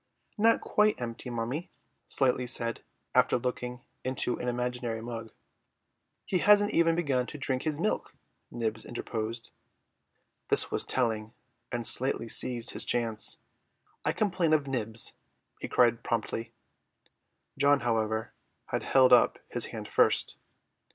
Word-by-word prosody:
"Not 230 +2 +4
quite 210 0 +2
empty, 120 +1 -5
mummy," 120 +8 -3 0.4
Slightly 125 -2 +1
said, 115 -1 0 0.3
after - - +4
looking 125 0 -4 0.2
into 130 -1 0
an 125 - -4
imaginary 125 -1 -2
mug. 115 -1 -7 0.9
"He 185 - 0
hasn't 205 +1 +5
even 165 0 +3
begun 135 -7 0
to 150 - -7
drink 130 -2 -1
his 155 -1 -2
milk," 215 - -2 0.3
Nibs 115 -2 -2
interposed. 115 -1 -5 1.0
This - - +1
was - - +1
telling, 110 -3 -1 0.4
and 120 -1 -3
Slightly 130 -2 +1
seized 120 +1 +3
his - - -3
chance. 115 -3 0 0.7
"I - - +2
complain 185 -6 +1
of 150 -2 +3
Nibs," 115 -4 +1 0.5
he - - -5
cried 120 -2 +3
promptly. 115 0 -3 1.0
John, 140 0 +3
however, 110 -2 -1 0.4
had - - -1
held 130 -1 +5
up - - +5
his - - -2
hand - - -7
first. - - +2
125 Hz, 130 wpm, -29 LUFS, 115-140 Hz, 1.0 s, hasn't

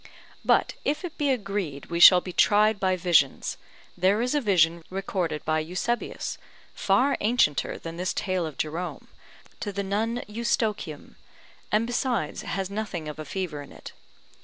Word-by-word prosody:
But - - +3
if 300 +6 -1
it 340 - -7
be 290 -1 +1
agreed 195 - -3
we 170 - -1
shall 180 +1 +9
be 180 - -7
tried 210 +2 +4
by 190 -1 +2
visions, 170 -6 +2 0.4
there 190 +4 +2
is 250 +3 0
a 295 - +2
vision 170 - +3
recorded 185 -5 -3
by 155 0 +1
Eusebius, 185 +9 -3 0.3
far 275 +2 +2
ancienter 210 - +2
than 165 0 -7
this 180 +2 -1
tale 185 -4 -1
of 155 - -9
Jerome, 165 +4 -4 0.5
to 205 - -3
the 200 0 -3
nun 220 +5 -1
Eustochium, 210 -7 -2 0.5
and, 215 +2 +3
besides, 240 - -1
has 195 0 -3
nothing 200 -6 -4
of 150 0 -7
a 155 - -5
fever 160 -2 -4
in 140 - -12
it. - - -11
190 Hz, 160 wpm, -26 LUFS, 165-220 Hz, 0.5 s, shall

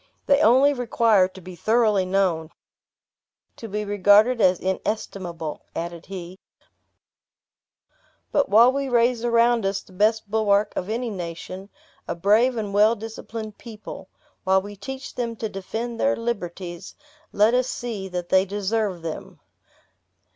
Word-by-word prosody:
"They 280 +1 +4
only 275 +2 +5
require 230 -6 +3
to 190 0 -14
be 180 0 -10
thoroughly 215 0 +2
known, 185 -4 0 1.1
to 225 - -8
be 210 0 -3
regarded 205 +4 +4
as 180 -1 +4
inestimable," 185 -4 -4
added 170 0 -5
he; 185 -1 -8 1.9
"but 285 - +1
while 230 +5 +7
we 275 0 -2
raise 240 -1 +2
around 235 -1 +3
us 195 0 -1
the 185 - -19
best 215 +3 +1
bulwark 210 -1 +2
of 185 - -3
any 235 +1 -2
nation, 185 +1 -7 0.4
a - - -3
brave 220 +8 +3
and 205 -3 -3
well 210 +3 +5
disciplined 220 0 -8
people; 220 -3 -10 0.3
while 190 0 +3
we 205 0 -9
teach 265 +7 -7
them 235 -2 -3
to 225 - -3
defend 225 +4 -5
their 280 - +2
liberties, 185 -5 -5 0.4
let 215 +3 +3
us 250 0 +2
see 225 -7 -5
that 180 -1 -5
they 190 0 +5
deserve 200 -2 -2
them. 160 -1 -7
210 Hz, 140 wpm, -23 LUFS, 190-230 Hz, 1.9 s, while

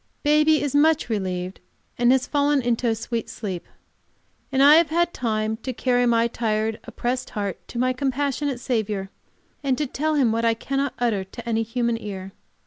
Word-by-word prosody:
Baby 305 0 +4
is 285 - -2
much 305 -1 +3
relieved, 185 -3 -3 0.4
and 240 0 +3
has 265 0 +3
fallen 290 0 +2
into 240 0 0
a 225 - +2
sweet 230 +1 -4
sleep. 185 -5 -5 0.8
And 270 0 +3
I 295 +2 +9
have 335 -1 +4
had 345 +2 +1
time 220 -2 -1
to 255 +3 -5
carry 245 0 +1
my 230 0 +3
tired, 220 -1 -1
oppressed 250 +1 -3
heart 200 -3 -3
to - - -8
my 255 +1 +2
compassionate 275 0 -1
Saviour, 215 -6 -2 0.5
and 265 -2 +1
to 300 - 0
tell 305 +4 -1
Him 260 -6 +3
what 230 +1 0
I 230 -1 +3
cannot 275 +3 -2
utter 225 -5 0
to 235 +5 -10
any 225 -1 +1
human 230 0 -1
ear. 195 -2 -6
240 Hz, 180 wpm, -24 LUFS, 220-275 Hz, 0.8 s, I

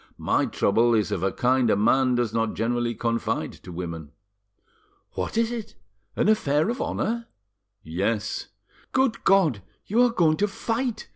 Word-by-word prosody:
My - - +1
trouble 115 +3 +2
is 105 -2 +1
of 85 - -1
a 95 0 +1
kind 125 -1 +2
a - - +4
man 125 +5 +3
does 120 -3 0
not 115 -1 0
generally 120 +1 -1
confide 115 +1 -2
to 90 - -10
women." 85 -3 -6 1.0
"What - - -4
is 230 0 +2
it? 230 -3 -6 0.4
An - - +1
affair 160 -6 +2
of 245 - -4
honour? 230 +1 -2 0.6
"Yes." 100 +7 -2 0.5
"Good 260 -3 +1
God! 170 - +3 0.2
You 225 +5 +2
are 245 - +5
going 165 -8 +2
to 205 - +2
fight!" 225 +3 -3
125 Hz, 155 wpm, -25 LUFS, -, 1.0 s, are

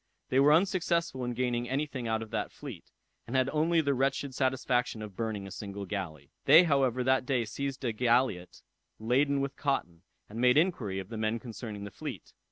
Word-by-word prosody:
They 130 - +3
were 140 +2 +6
unsuccessful 170 -5 +1
in 120 0 -3
gaining 120 -1 -1
any 140 +3 0
thing 130 -5 -5
out 110 0 0
of 110 - -12
that - - -2
fleet, - - -10 0.4
and 120 - -4
had 130 0 +3
only 165 +2 +2
the 140 -2 +1
wretched 135 +1 0
satisfaction 125 -3 0
of 105 -3 -9
burning 110 -3 -3
a 95 - -9
single 100 0 -6
galley. 85 -8 -5
They 160 +6 +9
however 135 -6 +2
that 130 +1 +3
day 125 -3 0
seized 135 +4 -4
a 115 - 0
galliot 120 -5 +1 0.3
laden 135 +5 +2
with 140 0 -3
cotton, 90 - -2 0.3
and 110 +3 -6
made 125 +2 +5
inquiry 145 - +1
of 95 0 -5
the 115 - -6
men 110 +1 0
concerning 110 -3 -7
the 100 - -7
fleet. - - -8
125 Hz, 195 wpm, -30 LUFS, 110-140 Hz, 0.4 s, They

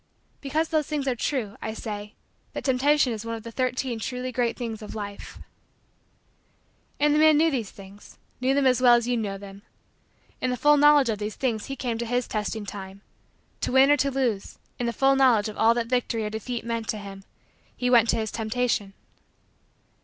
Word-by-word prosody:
Because 305 +4 -1
those 310 -3 0
things 295 -3 -2
are 260 - +2
true, 235 -4 -2
I 220 - -4
say: 210 -2 -6 0.4
that - - -5
Temptation 270 0 +2
is 215 -1 -6
one 230 0 -4
of 225 - -9
the 230 - -8
Thirteen 255 -1 -2
Truly 250 +2 -4
Great 240 -1 -1
Things 230 -3 -5
of 210 - -8
Life. 205 -1 -7 1.6
And 295 0 +3
the 300 - +3
man 310 -1 +6
knew 325 +1 +3
these 235 -7 -2
things 195 +1 -14 0.2
knew 260 +2 +2
them 280 -1 +2
as 255 -1 +3
well 245 -1 +7
as 235 0 0
you 245 - +1
know 205 -4 -3
them. 195 0 -11 0.8
In 255 - 0
the 250 - -1
full 295 +4 +5
knowledge 295 -3 +5
of 215 -2 -1
these 210 0 -4
things 230 -5 -2
he 275 - -4
came 240 -3 -3
to 235 - -3
his 245 +1 -1
testing 215 0 -3
time. 195 -1 -8 0.6
To - - -2
win 265 +2 +6
or 290 - +5
to 280 +1 +1
lose, 250 -7 -2 0.2
in 240 - -1
the - - 0
full 270 +3 +3
knowledge 245 -6 +4
of 210 - -9
all 225 +1 +5
that 235 -1 0
victory 230 -2 -1
or 210 - -4
defeat 230 +2 -5
meant 230 -1 -3
to 215 - -2
him, 195 -1 -9 0.5
he 250 - -1
went 235 -2 +5
to - - +3
his 220 -2 -2
Temptation. 225 -3 -1
235 Hz, 205 wpm, -25 LUFS, 215-265 Hz, 1.6 s, well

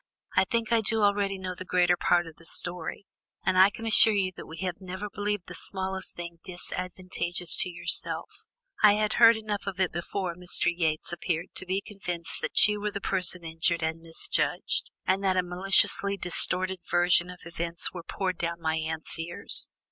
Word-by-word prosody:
"I - - +4
think 230 -2 -2
I 230 - +4
do 220 0 +1
already 200 -1 +1
know 185 -1 -5
the 185 - -8
greater 180 -1 +2
part 175 0 +2
of 165 -1 -12
the 165 - -17
story, 175 +3 -1 0.4
and 190 - +2
I 190 +2 +7
can 225 +2 -9
assure 220 0 +6
you 190 -2 0
that - - -10
we 160 - -10
have 185 0 -4
never 190 +2 -6
believed 205 -2 -3
the 180 - -9
smallest 190 0 -4
thing 170 -1 -8
disadvantageous 180 -1 -3
to 180 - +1
yourself. 175 0 -2 0.3
I 210 -1 +7
had 210 0 0
heard 230 -1 +8
enough 210 -2 -4
of 190 -2 -4
it 185 -2 +1
before 175 +2 -3
Mr. 175 0 +2
Yates 160 -1 -1
appeared 175 0 -3
to 185 - -4
be 190 +2 -1
convinced 180 -5 -3
that - - +4
you 210 0 -2
were 210 - -1
the 200 - -5
person 185 -2 +1
injured 165 +1 -1
and 160 +1 -2
misjudged, 165 -1 -1 0.2
and 190 +2 +1
that 190 -1 +2
a 185 - +3
maliciously 195 +2 +3
distorted 185 +1 +1
version 175 0 +3
of 180 -2 -11
events 170 0 -3
was 175 -2 -7
poured 185 -2 -3
down 170 0 -3
my 160 -1 -1
aunt's 160 0 -3
ears. 170 +1 0
180 Hz, 190 wpm, -27 LUFS, 170-195 Hz, 0.4 s, heard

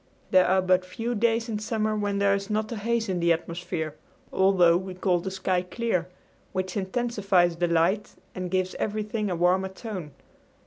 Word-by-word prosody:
There 185 -1 +6
are 190 +1 +3
but 185 0 +3
few 225 +6 -4
days 230 +1 +1
in 215 -2 -2
summer 215 0 -1
when 205 -1 -1
there 200 0 +3
is 200 +1 -2
not 215 +1 -1
a - - -2
haze 230 +2 0
in 185 -2 -1
the 170 0 +3
atmosphere, 165 -1 -2 0.4
although 190 -3 +5
we 185 +1 -3
call 180 -1 +1
the 190 - -4
sky 185 -1 0
clear, 180 -2 -2 0.5
which 185 +2 -2
intensifies 195 -4 +1
the 175 0 +1
light 170 +5 +1 0.2
and 185 -1 -4
gives 185 0 0
everything 215 0 -2
a 180 - -1
warmer 180 +3 +2
tone. 190 -5 -7
190 Hz, 180 wpm, -26 LUFS, 180-215 Hz, 0.5 s, There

